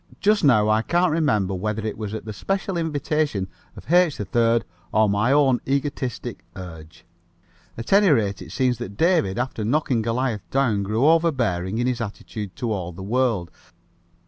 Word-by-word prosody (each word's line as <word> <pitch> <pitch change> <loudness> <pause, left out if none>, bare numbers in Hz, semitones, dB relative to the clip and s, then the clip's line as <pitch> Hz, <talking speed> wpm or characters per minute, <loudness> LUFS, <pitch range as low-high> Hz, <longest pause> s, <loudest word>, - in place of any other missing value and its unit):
Just 210 +1 +2
now 110 -7 +5
I 110 +1 +3
can't 175 +7 +1
remember 130 - +1
whether 105 +3 -3
it 110 - -3
was 105 -1 -5
at 110 - -7
the 110 - -5
special 195 - -2
invitation 150 - -1 0.3
of 165 - -5
H. 175 -5 +4
3rd 115 +3 +1 0.3
or 110 +1 +3
my 105 +5 +1
own 135 -3 +3
egotistic 130 - -3
urge. 80 -3 -10 0.7
At 115 +10 -3
any 200 -1 +6
rate, 105 -9 +1
it - - -10
seems 125 -3 0
that 100 -4 -7
David, 165 - +2
after 120 -3 -2
knocking 130 0 +1
Goliath 115 -1 -2
down, 130 -7 +1
grew 110 +6 0
overbearing 125 - +2
in 120 - 0
his 125 -1 -1
attitude 105 -2 -6
to 120 -2 -3
all 90 -4 -3
the 90 +2 -9
world. 110 -5 0
115 Hz, 170 wpm, -23 LUFS, 105-145 Hz, 0.7 s, any